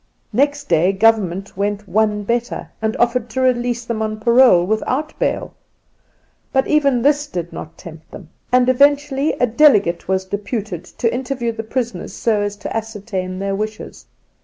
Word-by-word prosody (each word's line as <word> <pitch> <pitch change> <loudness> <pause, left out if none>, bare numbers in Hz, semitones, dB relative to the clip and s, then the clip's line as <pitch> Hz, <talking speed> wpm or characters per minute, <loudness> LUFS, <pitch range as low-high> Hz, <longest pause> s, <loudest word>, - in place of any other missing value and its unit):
Next 285 +2 +1
day 170 +3 +3
Government 195 -3 +1
went 205 +1 -2
one 210 +2 +1
better 235 +3 -2
and 220 0 -1
offered 240 0 +1
to 260 +3 -2
release 245 -2 0
them 230 -2 -3
on 215 0 -3
parole 235 -5 +5
without 255 +9 -1
bail. - - -1 1.0
But 265 -1 +2
even 280 -6 +2
this 290 0 +2
did 175 - -5
not 155 - -9
tempt 160 -1 -12
them, 170 -6 -12 0.2
and 250 0 +4
eventually 280 +2 +3
a - - +1
delegate 220 - +3
was 190 0 0
deputed 200 -2 -4
to 230 +5 -2
interview 250 -2 -2
the 225 0 -5
prisoners 225 -4 -4
so 220 -3 0
as 205 0 -2
to - - -7
ascertain 205 -4 -4
their 195 +1 -2
wishes. 215 +2 -6
225 Hz, 160 wpm, -19 LUFS, 195-250 Hz, 1.0 s, parole